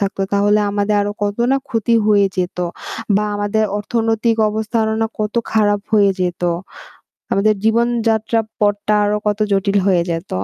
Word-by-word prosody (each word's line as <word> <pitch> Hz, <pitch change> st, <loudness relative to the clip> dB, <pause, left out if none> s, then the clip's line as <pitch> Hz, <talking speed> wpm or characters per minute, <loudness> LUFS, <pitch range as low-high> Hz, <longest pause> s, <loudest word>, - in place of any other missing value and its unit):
থাকতো 200 Hz, -1 st, -2 dB
তাহলে 205 Hz, +1 st, +3 dB
আমাদের 205 Hz, +1 st, 0 dB
আরো 205 Hz, 0 st, -2 dB
কত 205 Hz, 0 st, -1 dB, 0.2 s
না 275 Hz, -, +3 dB
ক্ষতি 230 Hz, 0 st, 0 dB
হয়ে 205 Hz, -2 st, +4 dB
যেত। 180 Hz, -1 st, -2 dB, 0.6 s
বা 210 Hz, -, +1 dB
আমাদের 205 Hz, +1 st, 0 dB
অর্থনৈতিক 225 Hz, +1 st, 0 dB
অবস্থা 220 Hz, +2 st, -3 dB
আরো 220 Hz, 0 st, -1 dB
না 225 Hz, -, +2 dB
কত 210 Hz, 0 st, -2 dB, 0.2 s
খারাপ 205 Hz, -2 st, +2 dB
হয়ে 205 Hz, -2 st, +5 dB
যেত। 180 Hz, -1 st, -2 dB, 0.9 s
আমাদের 215 Hz, +2 st, +3 dB
জীবনযাত্রা 230 Hz, -1 st, +1 dB, 0.2 s
পথটা 205 Hz, 0 st, +1 dB
আরো 205 Hz, +1 st, +1 dB
কত 210 Hz, 0 st, +1 dB
জটিল 195 Hz, +1 st, +1 dB
হয়ে 180 Hz, -3 st, +3 dB
যেত। 165 Hz, +3 st, -4 dB
210 Hz, 155 wpm, -18 LUFS, 200-220 Hz, 0.9 s, হয়ে